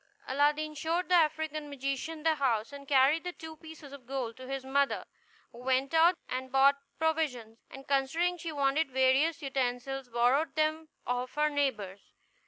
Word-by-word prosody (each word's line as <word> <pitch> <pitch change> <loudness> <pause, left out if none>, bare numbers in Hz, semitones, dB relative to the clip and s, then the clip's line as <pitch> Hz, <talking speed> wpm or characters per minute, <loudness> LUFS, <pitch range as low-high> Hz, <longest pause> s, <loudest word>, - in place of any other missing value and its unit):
Aladdin 295 +3 +1
showed 330 +4 -2
the - - +2
African 310 -2 +1
magician 280 +3 -4
the 320 -1 +4
house, 260 -4 0
and 280 -1 -10
carried 280 +4 +4
the 360 0 -4
two 320 -1 -10
pieces 310 -3 -12
of 260 -4 -12
gold 255 -4 -3
to 255 0 -10
his 270 0 -4
mother, 275 +1 +1 0.5
who 240 - -13
went 260 +3 0
out 335 +2 +5
and 260 0 -4
bought 275 +1 +5 0.2
provisions; 285 -9 -1
and, 270 0 -11
considering 305 +6 +1
she 335 -1 -6
wanted 280 +1 +1
various 265 +5 +2
utensils, 265 0 -2
borrowed 245 +6 +2
them 310 0 0 0.2
of 250 +1 -3
her 300 0 +2
neighbors. 215 -10 -2
280 Hz, 165 wpm, -30 LUFS, 260-315 Hz, 0.5 s, out